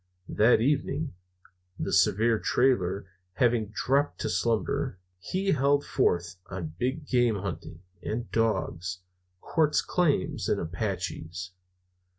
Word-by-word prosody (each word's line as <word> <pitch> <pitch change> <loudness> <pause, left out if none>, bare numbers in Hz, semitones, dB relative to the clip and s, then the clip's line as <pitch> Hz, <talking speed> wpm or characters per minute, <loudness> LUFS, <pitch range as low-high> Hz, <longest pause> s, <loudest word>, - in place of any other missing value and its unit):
That 115 +2 +4
evening, 140 +2 0 0.6
the - - -3
severe 110 +4 +3
Trailer 100 -7 +1 0.3
having 115 0 +2
dropped 135 +7 0
to - - -1
slumber, 115 +5 0 0.2
he 190 - -1
held 140 0 +2
forth 90 -8 0
on 85 -4 -5
big 135 +7 -1
game 120 -3 +3
hunting 95 -3 -6 0.2
and 120 +2 -4
dogs, 95 -5 -1 0.4
quartz 155 -2 +2
claims 155 - 0
and - - +2
Apaches. 90 -1 -4
115 Hz, 110 wpm, -28 LUFS, 95-135 Hz, 0.6 s, That